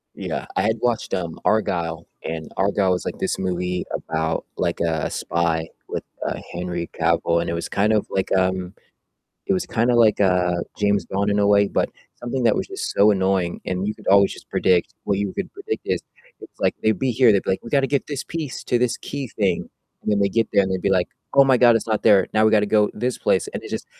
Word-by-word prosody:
Yeah, - - -4
I - - +2
had 110 +1 +1
watched, 120 -2 -1
um, 85 -4 -3
Argylle, 85 -6 0 0.2
and 80 -1 -5
Argylle 95 -1 +2
was, 90 - 0
like, - - -4
this - - -2
movie 90 -1 -2
about, 80 0 -2
like, - - -1
a 80 -2 0
spy 85 -1 -1 0.2
with, - - -3 0.2
uh, - - -3
Henry 85 -1 -4
Cavill, 85 0 +2
and - - -3
it 85 - -1
was 85 - -3
kind 105 +2 +1
of 105 - +1
like, 95 - -1
um, 95 0 0 0.7
it - - +3
was 95 - -1
kinda 120 +2 +1
like, 110 -3 +4
uh, 90 -2 +3 0.2
James 100 -1 +1
Bond 100 +1 -1
in 100 - +1
a 100 - +3
way, 100 0 +4
but - - 0 0.3
something 120 +1 -3
that 115 - +4
was - - -2
just 390 0 -4
so 105 +1 +5
annoying, 95 -3 0
and 95 +2 -2
you 105 - -2
could 105 - -14
always 100 0 +5
just - - -14
predict 90 -2 +2
what 100 - 0
you 100 -2 -2
could 195 - -4
predict 400 +3 -5
is, - - -1 0.4
it's - - -14
like - - +1
they'd 110 0 +2
be 130 -1 +1
here, 120 -1 +5
they'd 100 - +3
be - - -4
like, 95 - -2
"We 115 - -8
gotta 135 0 +2
get 140 -1 0
this 145 -2 -4
piece 160 -5 -5
to 120 - +2
this 125 0 0
key 140 -1 -5
thing." 95 -6 -1 0.3
And - - -1
then 105 - +2
they 100 -1 +2
get 115 +2 +1
there, 100 - +5
and 95 - -2
they'd 95 -1 -2
be - - +1
like, 90 -2 +2 0.3
"Oh 140 - +7
my 130 -2 +4
god, 120 -1 +6
it's 115 - -1
not 110 -1 0
there. 100 -4 +5
Now 110 0 +3
we 110 - +4
gotta 105 -1 +4
go 105 0 +3
this 125 +3 -2
place." - - +1
And - - -6
it - - -8
just, - - -4
100 Hz, 240 wpm, -22 LUFS, 90-115 Hz, 0.7 s, Oh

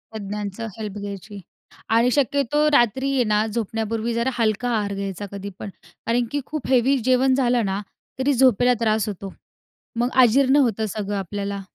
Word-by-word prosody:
तज्ञांचं 210 +1 -5
हेल्प 210 -1 -5
घ्यायची 200 0 -7 0.5
आणि 230 +2 +3
शक्यतो 285 +2 +1
रात्री 265 +2 +2
आहे 255 -2 +3
ना, 215 0 +1
झोपण्यापूर्वी 225 +1 -2
जरा 235 +3 0
हलका 230 +2 0
आहार 210 -3 -1
घ्यायचा 195 0 -4
कधी 200 0 -6
पण, 205 - -6 0.4
कारण 235 +1 +1
की 290 0 -1
खूप 305 -4 -5
हेवी 265 +1 +3
जेवण 260 0 +3
झालं 245 -4 +2
ना, 195 +1 -1 0.4
तरी 280 +2 +2
झोपेला 250 -1 +4
त्रास 220 -1 +1
होतो, 195 -1 -7 0.7
मग 245 +1 +1
आजीर्ण 265 +3 +4
होतं 220 -1 -1
सगळं 205 -1 -3
आपल्याला. 200 +1 -4
225 Hz, 160 wpm, -22 LUFS, 205-255 Hz, 0.7 s, झोपेला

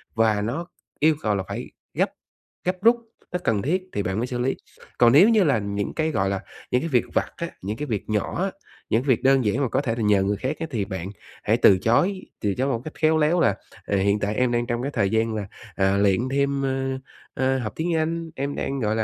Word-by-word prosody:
và 110 -2 +3
nó 130 +11 -3 0.3
yêu 155 +1 +4
cầu 105 -2 +1
là 95 - -1
phải - - -6 0.2
gấp - - +1 0.5
gấp 180 +1 -1
rút, 235 +1 +6 0.3
nó 180 - -1
cần 105 -3 +1
thiết 180 - 0
thì 100 - -1
bạn 95 +1 -2
mới 120 +3 -1
xử 125 -1 -4
lý. 130 +2 0 0.4
Còn 120 -1 +6
nếu 185 +10 +8
như 220 -3 +5
là 140 -9 +3
những 100 0 -3
cái, 160 0 0
gọi 95 -7 +1
là, 95 -1 -2 0.3
những 125 - +3
cái 165 - -2
việc 125 -5 +2
vặt - - +1
á, 170 0 -4
những 105 +4 -4
cái 150 - -3
việc 110 -3 -3
nhỏ 110 - -1
á, 195 - -1 0.4
những 115 +3 +2
cái - - -9
việc 125 - +3
đơn 135 -2 +4
giản 105 +7 +1
mà 135 - +1
có 130 - +1
thể 115 -5 -1
là 120 - -3
nhờ 105 -2 +4
người 100 +1 0
khác 135 +4 -2
á, 165 - -3
thì 110 -6 -1
bạn 95 -1 -5 0.3
hãy - - +2
từ 95 - +6
chối, 180 - +2 0.2
từ 100 -2 +1
chối 130 +2 0
một 120 -4 -1
cách 155 - -6
khéo 160 0 +3
léo 155 +3 +3
là, 100 - +3 0.3
à, 100 - 0
"Hiện 100 +2 +2
tại 105 +1 -1
em 125 0 +2
đang 120 0 +1
trong 120 0 -1
cái 140 +3 -2
thời 100 -8 +1
gian 110 +1 +1
là, 105 -2 -3 0.3
à, 95 0 +2
luyện 100 -2 +3
thêm, 140 0 +1
ơ, 135 0 -1 0.3
ơ 130 0 +1
học 105 -4 -4
tiếng 170 +1 -1
Anh, 165 +1 -1
em 140 +1 -3
đang, 135 0 -2
gọi 110 -3 0
là, 110 - +1
125 Hz, 260 wpm, -24 LUFS, 105-150 Hz, 0.5 s, nếu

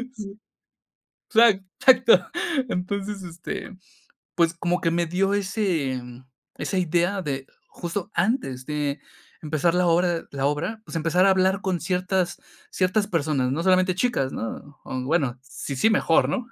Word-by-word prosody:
Sí, 200 -3 -8 1.0
exac 220 -4 +5 0.2
exacto. 265 - +6 0.4
Entonces, 200 +2 -3
este, 175 +3 -7 0.6
pues, 170 -1 +3
como 175 +1 -1
que 165 - +1
me 170 0 +1
dio 195 +4 +1
ese, 190 - -1
mm, 125 +1 -12 0.3
esa 190 - -1
idea 175 +3 +1
de, 135 -4 -4 0.2
justo 175 +3 -5
antes 165 - 0
de 150 -1 -2 0.4
empezar 155 +2 +1
la 180 0 +2
obra 170 0 +2
la 140 -1 -1
obra, 165 +10 -2
pues - - -10
empezar 165 +4 +3
a - - +6
hablar 190 +1 +2
con 185 -3 -1
ciertas 180 0 0 0.3
ciertas 190 +3 +1
personas, 145 -6 0
no 155 +5 -1
solamente 185 0 +3
chicas, 185 - 0
¿no?, 135 +5 -7
o 130 0 -4
bueno, 135 -3 0
si 135 +1 -6
sí, 220 +12 +3
mejor, 170 -6 +3
¿no? 250 -3 -2
175 Hz, 150 wpm, -24 LUFS, 150-195 Hz, 1.0 s, exacto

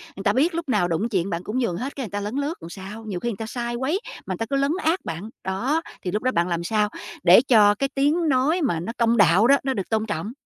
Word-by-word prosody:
người 195 - -7
ta 200 - +3
biết 320 +8 +2
lúc 335 -4 -4
nào 205 -7 +2
đụng 180 +7 -1
chuyện 190 -4 0
bạn 170 0 -3
cũng 220 +7 -2
nhường 205 -9 -1
hết, 265 +4 -5
cái 275 - -4
người - - -8
ta 205 - -2
lấn 210 +4 -4
lướt 285 +3 -1
rồi 165 - -9
sao? 195 +4 -9
Nhiều 195 -5 -4
khi 240 - -2
người 210 - -5
ta 225 - -5
sai 240 +1 -4
quấy, 265 +10 -1 0.3
mà 190 - -3
ta 225 - -1
cứ 275 - 0
lấn 275 +1 +2
át 325 +4 +1
bạn, 170 +6 -5
đó, 245 +12 0 0.2
thì 180 - -3
lúc 210 +4 -2
đó 255 - +2
bạn 170 -6 +1
làm 170 -1 -2
sao 210 +3 +1 0.3
để 180 +5 +8
cho 215 -6 +5
cái 275 +5 -1
tiếng 305 +4 +2
nói 285 +7 +2
mà 225 - 0
nó 175 +7 -4
công 235 0 +2
đạo 200 +2 +5
đó 280 +2 +6
nó 265 0 0
được 195 -6 -4
tôn 220 -1 0
trọng? 210 0 -4
225 Hz, 295 wpm, -23 LUFS, 195-270 Hz, 0.3 s, để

